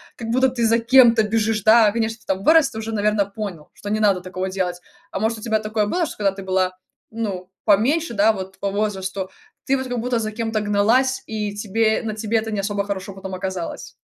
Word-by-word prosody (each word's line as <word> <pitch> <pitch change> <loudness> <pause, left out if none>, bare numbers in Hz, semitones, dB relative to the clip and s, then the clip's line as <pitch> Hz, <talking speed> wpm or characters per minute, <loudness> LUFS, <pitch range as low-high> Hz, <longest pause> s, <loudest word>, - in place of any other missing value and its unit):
как 225 -1 -6
будто, 260 +2 +3
ты 240 -2 -1
за 230 +1 +4
кем-то 235 -2 +6
бежишь, 215 -1 0
да. 220 -1 +6
Конечно, 225 0 -1
ты - - -24
там 190 0 -1
вырос, 315 -3 +5
ты 220 - -9
уже, 225 0 -5
наверно, 210 -1 +1
понял, 200 -6 -7
что 205 - -8
не 215 +1 0
надо 200 -4 +3
такого 185 +1 -4
делать. 180 -2 -2 0.3
А - - -3
может 220 +1 -1
у - - -13
тебя 220 -1 0
такое 215 0 -1
было, 345 +7 0
что - - -8
когда 200 -2 +2
ты 195 0 -9
была, 185 -1 0 0.3
ну, 200 -5 -4 0.2
поменьше, 235 +8 +2
да, 210 +2 +4
вот 190 -2 -7
по 200 - -1
возрасту, 195 -2 -2 0.4
ты 270 - +2
вот 260 0 -4
как 245 -1 -3
будто 240 0 0
за 215 -1 -3
кем-то 225 -1 -2
гналась, 220 +6 +2
и 210 -2 -4
тебе 220 +2 +1
на 215 -2 -3
тебе 220 +1 0
это 220 0 -2
не 205 - -2
особо 200 0 -1
хорошо 195 -1 -5
потом 190 0 -8
оказалось? 185 -2 -5
215 Hz, 225 wpm, -21 LUFS, 195-225 Hz, 0.4 s, кем-то